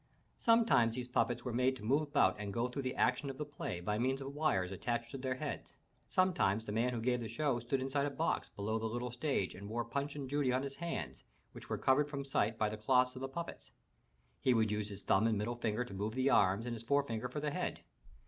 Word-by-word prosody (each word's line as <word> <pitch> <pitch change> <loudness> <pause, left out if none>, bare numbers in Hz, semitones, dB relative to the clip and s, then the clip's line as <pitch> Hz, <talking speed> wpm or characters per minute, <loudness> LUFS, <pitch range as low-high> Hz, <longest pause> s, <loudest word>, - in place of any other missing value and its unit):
Sometimes 225 - +4
these 125 -1 -3
puppets 120 -1 0
were 125 - -2
made 130 +2 +2
to 120 - -11
move 135 +7 +3
about 145 -11 +3
and 105 -1 -4
go 120 +4 0
through 125 +3 -4
the 130 -1 -3
action 140 - +2
of 135 - -6
the 150 - -3
play 145 -11 -5
by 105 +4 -1
means 130 +2 +1
of 135 0 -6
wires 100 -12 +1
attached 120 +4 -2
to - - -5
their 130 0 -1
heads; - - -5 0.3
sometimes 175 - +2
the 105 - -4
man 115 +4 +1
who 120 - -2
gave 125 +2 +1
the 115 - -3
show 125 +2 0
stood 120 +3 -1
inside 135 +2 0
a - - 0
box 160 +4 -1
bel6w 110 +2 -1
the 110 - -1
little 120 +2 -3
stage 125 -6 -1
and 100 +2 -8
wore 120 +1 -1
Punch 140 +4 -3
and 140 -2 -4
Judy 140 -1 +1
on 130 +1 +1
his 140 0 -5
hands, 170 0 -4 0.3
which - - -11
were - - -1
covered 145 +3 +3
from 140 -2 -4
sight 115 -5 +1
by 110 - +2
the 105 +1 -4
clothes 125 +3 +3
of 130 - -7
the 135 - -2
puppets. 170 +5 -7 0.7
He 130 - +3
would 110 -2 +2
use 105 0 -1
his 100 -1 -8
thumb 110 +4 +4
and 110 -2 +2
middle 110 +4 -1
finger 120 0 -1
to 100 - -9
move 105 +4 -3
the 130 +1 +2
arms 100 +4 +4
and 120 - -2
his 115 - -6
forefinger 125 -2 0
for 135 - -4
the 150 0 -1
head. - - -3
125 Hz, 250 wpm, -35 LUFS, 110-140 Hz, 0.7 s, Sometimes